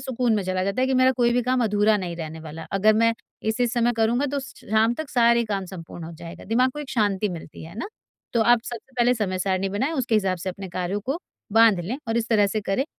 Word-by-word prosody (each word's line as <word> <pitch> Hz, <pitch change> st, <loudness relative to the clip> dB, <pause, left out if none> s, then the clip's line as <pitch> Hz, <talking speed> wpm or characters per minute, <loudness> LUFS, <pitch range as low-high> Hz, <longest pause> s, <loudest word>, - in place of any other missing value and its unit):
सुकून 250 Hz, -3 st, 0 dB
में 200 Hz, -, 0 dB
चला 185 Hz, 0 st, -1 dB
जाता 200 Hz, +5 st, -1 dB
है 260 Hz, -, +3 dB
कि 265 Hz, -, +1 dB
मेरा 255 Hz, 0 st, +5 dB
कोई 240 Hz, -1 st, +3 dB
भी 245 Hz, -, +2 dB
काम 250 Hz, 0 st, +1 dB
अधूरा 210 Hz, 0 st, +3 dB
नहीं 180 Hz, -3 st, -4 dB
रहने 160 Hz, -1 st, -6 dB
वाला। 160 Hz, +1 st, -8 dB
अगर 210 Hz, +2 st, +4 dB
मैं 230 Hz, +1 st, +4 dB, 0.4 s
इस-इस 235 Hz, +2 st, 0 dB
समय 240 Hz, 0 st, +2 dB
करूँगा 235 Hz, +5 st, +2 dB
तो 285 Hz, 0 st, -2 dB
स 265 Hz, -, -10 dB, 0.2 s
शाम 220 Hz, +2 st, +3 dB
तक 315 Hz, 0 st, -6 dB
सारे 235 Hz, -2 st, +4 dB
काम 200 Hz, -3 st, -2 dB
संपूर्ण 170 Hz, -2 st, -9 dB
हो 165 Hz, -, -8 dB
जाएगा, 165 Hz, +1 st, -10 dB
दिमाग 250 Hz, +5 st, +2 dB
को 295 Hz, -, -9 dB
एक 290 Hz, -2 st, -6 dB
शांति 205 Hz, -3 st, +1 dB
मिलती 165 Hz, -3 st, -8 dB
है 165 Hz, +3 st, -11 dB
ना। -, -, -3 dB, 0.5 s
तो 235 Hz, -, +2 dB
आप 235 Hz, 0 st, +4 dB
सबसे 240 Hz, +2 st, -8 dB
पहले 245 Hz, +1 st, +4 dB
समय-सारिणी 190 Hz, -2 st, -1 dB
बनाएँ, 255 Hz, +11 st, -1 dB
उसके 255 Hz, -6 st, 0 dB
हिसाब 190 Hz, -4 st, +2 dB
से 185 Hz, +3 st, -4 dB
अपने 190 Hz, +1 st, -8 dB
कार्यों 180 Hz, +3 st, -2 dB
को 270 Hz, -, -3 dB, 0.3 s
बाँध 225 Hz, -4 st, +6 dB
लें 215 Hz, +10 st, -3 dB
और 225 Hz, -, 0 dB
इस 235 Hz, 0 st, 0 dB
तरह 210 Hz, -3 st, +4 dB
से 215 Hz, +2 st, -2 dB
करें। 200 Hz, +7 st, 0 dB
220 Hz, 250 wpm, -24 LUFS, 190-245 Hz, 0.5 s, बाँध